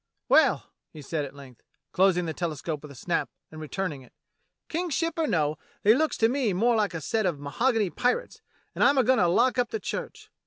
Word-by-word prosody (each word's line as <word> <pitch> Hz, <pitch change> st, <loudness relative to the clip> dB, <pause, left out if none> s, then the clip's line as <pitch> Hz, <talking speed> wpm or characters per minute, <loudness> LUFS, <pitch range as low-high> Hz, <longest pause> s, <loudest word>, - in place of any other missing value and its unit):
Well," -, -, +4 dB, 0.3 s
he 150 Hz, -, -11 dB
said 150 Hz, +1 st, -2 dB
at 135 Hz, 0 st, -11 dB
length, 135 Hz, -4 st, -14 dB, 0.3 s
closing 180 Hz, -2 st, +3 dB
the 160 Hz, -, -3 dB
telescope 155 Hz, -3 st, -4 dB
with 150 Hz, -, -11 dB
a -, -, -12 dB
snap, 170 Hz, +7 st, -2 dB, 0.2 s
and 155 Hz, 0 st, -9 dB
returning 155 Hz, -2 st, -4 dB
it, 130 Hz, -, -19 dB, 0.6 s
"Eang's 340 Hz, -1 st, -1 dB
ship 330 Hz, 0 st, 0 dB
or 320 Hz, -, +1 dB
no, 155 Hz, -6 st, 0 dB, 0.2 s
they 210 Hz, -, +7 dB
looks 310 Hz, +5 st, +1 dB
to 225 Hz, -, +4 dB
me 245 Hz, -4 st, 0 dB
more 230 Hz, +6 st, +2 dB
like 210 Hz, -5 st, 0 dB
a 165 Hz, -, -4 dB
set 215 Hz, +7 st, 0 dB
of 165 Hz, -5 st, -2 dB
mahogany 210 Hz, -, 0 dB
pirates, 250 Hz, -, -1 dB, 0.3 s
and -, -, 0 dB
I'm 280 Hz, 0 st, +5 dB
a 260 Hz, -, +5 dB
goin'to 255 Hz, -9 st, +3 dB
lock 250 Hz, +9 st, +2 dB
up 245 Hz, -1 st, +1 dB
the 220 Hz, -, -3 dB
church. -, -, -6 dB
190 Hz, 210 wpm, -27 LUFS, 155-245 Hz, 0.6 s, they